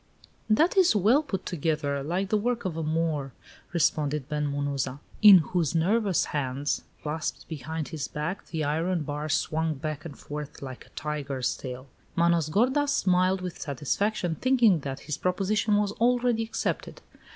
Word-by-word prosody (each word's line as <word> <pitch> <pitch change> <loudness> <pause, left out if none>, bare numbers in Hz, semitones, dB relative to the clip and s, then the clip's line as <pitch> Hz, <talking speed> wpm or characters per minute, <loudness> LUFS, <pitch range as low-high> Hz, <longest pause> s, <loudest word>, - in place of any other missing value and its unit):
"That 310 +12 +4
it - - +8
is 365 -7 +5
well 220 +9 +4
put 215 - -4
together, 150 -4 -1
like 180 +7 -2
the 215 - +2
work 240 0 -1
of 180 -4 -2
a 165 - -2
Moor," 155 -4 -1 0.4
responded 150 -4 +1
Ben 150 0 -1
Munuza, 140 -2 -2 0.2
in 205 -3 +11 0.2
whose 170 -3 +1
nervous 195 +3 +2
hands, 140 -1 -1 0.2
clasped 155 +2 -3
behind 160 0 -5
his 155 -4 -4
back, 160 +6 -4
the 160 -2 -3
iron 165 +3 0
bar 150 +1 -4
swung 160 +2 0
back 155 +2 -4
and 160 -5 -9
forth 150 0 -7
like 130 -2 -8
a - - -27
tiger's 140 -4 -2
tail. 130 0 -7 0.3
Manos 170 -2 +3
gordas 260 - +2
smiled 185 -6 +2
with 180 -2 -6
satisfaction, 170 - -1
thinking 235 - +3
that 135 -1 -5
his 150 -1 -4
proposition 205 +3 +1
was 205 -1 +1
already 240 +1 +2
accepted. 225 0 -3
160 Hz, 160 wpm, -27 LUFS, 145-200 Hz, 0.4 s, in